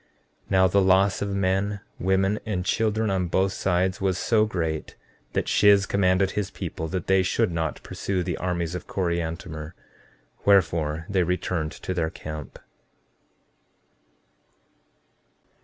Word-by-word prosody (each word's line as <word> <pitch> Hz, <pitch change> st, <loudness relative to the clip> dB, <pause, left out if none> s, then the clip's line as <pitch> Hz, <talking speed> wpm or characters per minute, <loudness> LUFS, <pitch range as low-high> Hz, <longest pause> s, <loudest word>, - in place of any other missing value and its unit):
14:31 -, -, -20 dB
Now 95 Hz, -1 st, +5 dB
the 100 Hz, +2 st, +3 dB
loss 95 Hz, +1 st, +3 dB
of 100 Hz, -, -1 dB
men, 100 Hz, +1 st, 0 dB, 0.2 s
women 95 Hz, +3 st, +1 dB
and 95 Hz, -5 st, -3 dB
children 110 Hz, 0 st, +1 dB
on 95 Hz, -2 st, 0 dB
both 95 Hz, +3 st, +1 dB
sides 95 Hz, 0 st, 0 dB
was 95 Hz, -2 st, +1 dB
so 110 Hz, +2 st, +2 dB
great 80 Hz, -6 st, -3 dB, 0.4 s
that -, -, -1 dB
Shiz 100 Hz, -1 st, +5 dB
commanded 95 Hz, -1 st, +2 dB
his 105 Hz, -2 st, -2 dB
people 80 Hz, -4 st, -5 dB
that 90 Hz, +2 st, -3 dB
they 95 Hz, 0 st, +4 dB
should 90 Hz, -1 st, +1 dB
not 80 Hz, -2 st, -3 dB
pursue 95 Hz, -2 st, -2 dB
the -, -, -2 dB
armies 85 Hz, -2 st, -2 dB
of 90 Hz, -, -6 dB
Coriantumr; 85 Hz, -3 st, -3 dB, 0.7 s
wherefore, 80 Hz, -5 st, +2 dB
they 100 Hz, -3 st, +1 dB
returned 90 Hz, -2 st, -1 dB
to 95 Hz, -, -5 dB
their 85 Hz, -3 st, 0 dB
camp. 75 Hz, -2 st, -8 dB
95 Hz, 135 wpm, -25 LUFS, 85-100 Hz, 0.7 s, Now